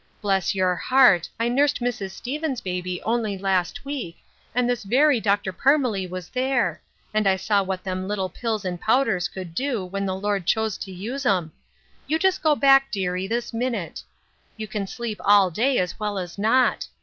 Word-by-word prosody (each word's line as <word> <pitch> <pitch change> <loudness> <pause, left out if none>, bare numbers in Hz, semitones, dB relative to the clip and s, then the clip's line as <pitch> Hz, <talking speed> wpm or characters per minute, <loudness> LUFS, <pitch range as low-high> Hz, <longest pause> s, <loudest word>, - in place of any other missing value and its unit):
Bless 195 -3 +1
youi 185 -2 +1
heart, 255 -10 +4
I 230 - +1
nursed 280 +4 +2
Mrs. 240 -5 -2
Stevens' 270 +6 -4
baby 180 -1 -4
only 220 -3 -1
last 190 +2 -1
week, 265 -12 -5 0.4
and 250 0 +2
this 245 -1 0
very 260 +5 +3
Dr. 200 -2 0
Parmelee 255 -7 +2
was 180 -1 -7
there; 250 - 0 0.3
and 215 -1 +2
I 190 - +4
saw 200 +2 +1
what 190 -1 -4
them 185 0 -3
little 200 -2 -1
pills 220 0 -3
and 180 -2 -4
powders 220 -7 +2
could 180 -2 -8
do 245 -2 -2
when 195 +2 -3
the 185 - -1
Lord 200 -2 -2
chose 220 -2 +1
to 190 - -6
use 230 +10 -5
'em. 185 -10 +1 0.6
You 315 - +1
just 380 +2 +1
go 310 -2 +3
back, 270 -1 +5
dearie, 185 -2 -2
this 235 +3 -3
minute. 230 -7 -3 0.6
You 215 -1 -5
can 200 -1 -4
sleep 230 0 -5
all 200 -3 +5
day 250 +9 +1
as 180 +2 -1
well 210 -1 -2
as 180 0 -6
not. 240 +5 +2
205 Hz, 185 wpm, -24 LUFS, 185-250 Hz, 0.6 s, back